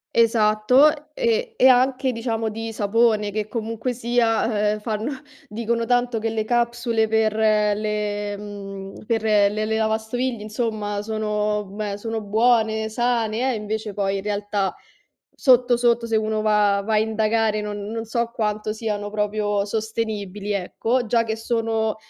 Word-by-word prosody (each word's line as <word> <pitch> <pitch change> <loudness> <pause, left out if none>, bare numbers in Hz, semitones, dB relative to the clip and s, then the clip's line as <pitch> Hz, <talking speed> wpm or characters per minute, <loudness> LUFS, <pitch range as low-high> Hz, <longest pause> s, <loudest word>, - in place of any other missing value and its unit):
Esatto, 230 +7 +3
e 475 -1 0
e 260 - +6
anche 260 +1 +3
diciamo 225 -1 -2
di 225 +1 -5
sapone, 215 0 +2
che 215 0 -2
comunque 225 +2 -3
sia, 225 -3 +1
eh, 215 - -4
fanno 215 +4 -3 0.4
dicono 230 +2 -1
tanto 245 0 +1
che 225 +1 -1
le 220 -1 -2
capsule 235 -1 +1
per 220 -1 +2
le 210 -1 0
mhmm, 195 -1 -8
per 225 0 0
le 210 -2 +4
le 215 +1 -1
lavastoviglie, 220 +2 -1
insomma, 215 -1 -3
sono 210 -1 -1
beh, 200 +1 -5
sono 225 +1 -4
buone, 220 +1 +2
sane 230 -1 0
eh, 260 +1 +1
è - - -2
invece 215 0 -4
poi 195 0 -1
in 195 - -5
realtà, 205 -1 -1 0.6
sotto 250 -2 +4
sotto, 235 -1 +2
se 225 - 0
uno 215 0 0
va 210 -2 +3
va 220 - -1
a - - +4
indagare 220 0 +1
non 210 0 -4
non 225 0 -4
so 235 +1 -2
quanto 215 -2 -1
siano 210 -2 -3
proprio 210 -1 0
sostenibili, 210 -2 -3
ecco. 225 +6 -1
Già 230 +1 +2
che 220 -1 -2
sono 225 -1 -1
220 Hz, 150 wpm, -23 LUFS, 210-230 Hz, 0.6 s, e